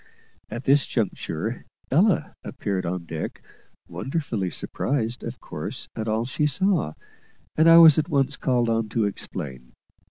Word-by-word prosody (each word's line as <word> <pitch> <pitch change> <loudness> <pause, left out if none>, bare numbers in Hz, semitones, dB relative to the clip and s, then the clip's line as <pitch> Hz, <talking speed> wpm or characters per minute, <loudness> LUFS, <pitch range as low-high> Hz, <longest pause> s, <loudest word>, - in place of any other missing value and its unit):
At 120 - -6
this 140 +2 +4
juncture 110 -1 -3 0.3
Ella 180 +7 +3
appeared 95 -3 -3
on 90 0 -3
deck, 80 -1 -6 0.4
wonderfully 130 - -3
surprised, 120 - -2
of - - -6
course, - - -6
at 110 0 -4
all 110 +2 0
she 150 +4 0
saw, 170 - +1 0.6
and 160 +2 +5
I 165 - +9
was 160 -3 +9
at 155 +2 -2
once 140 -2 +1
called 125 -2 +1
on 115 -1 0
to 110 0 +1
explain. 65 -10 -6
120 Hz, 140 wpm, -24 LUFS, 100-145 Hz, 0.6 s, I